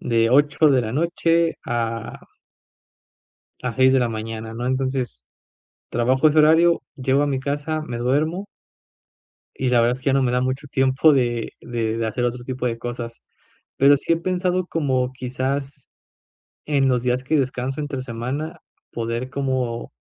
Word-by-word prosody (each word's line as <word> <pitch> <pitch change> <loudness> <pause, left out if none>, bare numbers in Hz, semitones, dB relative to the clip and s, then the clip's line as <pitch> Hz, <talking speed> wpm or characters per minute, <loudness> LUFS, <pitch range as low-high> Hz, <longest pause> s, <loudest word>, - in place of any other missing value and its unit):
de 115 -2 +2
8 145 +4 +4
de 130 -2 +3
la 110 -1 -4
noche 165 +2 +1
a 115 -2 -3 1.4
a 125 -2 -2
6 130 0 +5
de 135 - +4
la 120 -2 +1
mañana, 110 0 -5
¿no?, 120 +1 -4
entonces 130 - -2 0.6
trabajo 130 +5 +3
ese 155 +1 +4
horario, 160 +3 +5
llego 135 +1 +1
a - - +1
mi 135 -2 -1
casa, 145 +3 -2
me 120 -5 -5
duermo. 155 +10 0 1.1
Y 130 - -1
la 120 -1 +4
verdad 120 +1 +3
es - - -15
que 130 - -21
ya 135 - +4
no 135 0 +3
me 125 - +1
da 125 - +1
mucho 130 +3 -2
tiempo 135 +3 +3
de 120 -3 0
de 115 -2 -2
de 115 -1 -1
hacer 110 +3 -2
otro 120 0 -3
tipo 130 0 -4
de 115 -2 -1
cosas, 120 -1 -6 0.6
pero 140 +1 +6
sí 150 - -1
he - - +3
pensado 180 +1 -1
como 130 -7 0
quizás 130 +2 -4 0.8
en 140 -3 +2
los 125 -2 +1
días 125 0 0
que 150 +4 +1
descanso 130 0 -1
entre 145 -3 -4
semana, 130 +6 -5 0.3
poder 115 +2 -3
como 130 -4 -2
130 Hz, 165 wpm, -22 LUFS, 120-145 Hz, 1.4 s, pero